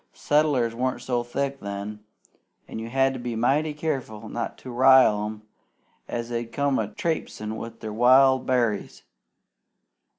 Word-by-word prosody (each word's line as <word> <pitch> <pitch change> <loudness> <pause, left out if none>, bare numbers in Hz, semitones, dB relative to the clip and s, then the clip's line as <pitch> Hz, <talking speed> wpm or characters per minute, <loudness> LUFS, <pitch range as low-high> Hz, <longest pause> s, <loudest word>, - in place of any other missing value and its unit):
Settlers 145 -6 +1
wasn't 130 +2 -2
so 120 -2 0
thick 140 +3 -3
then, 100 +1 -6 0.7
an' - - -6
you 115 +1 -6
had 135 +1 +2
to 130 - -6
be 120 -1 -4
mighty 140 +7 +1
careful 135 -8 -4
not 115 +1 -4
to 130 - -9
rile 125 -4 +5
'em, 105 0 -8 0.6
an' 120 0 -4
they'd 120 -1 -4
come 140 +1 0
a - - -1
trapesin' 165 - -3
with 115 0 -8
their 110 -1 -5
wild 130 +3 +5
berries. 120 -5 0
125 Hz, 145 wpm, -25 LUFS, 115-135 Hz, 0.7 s, rile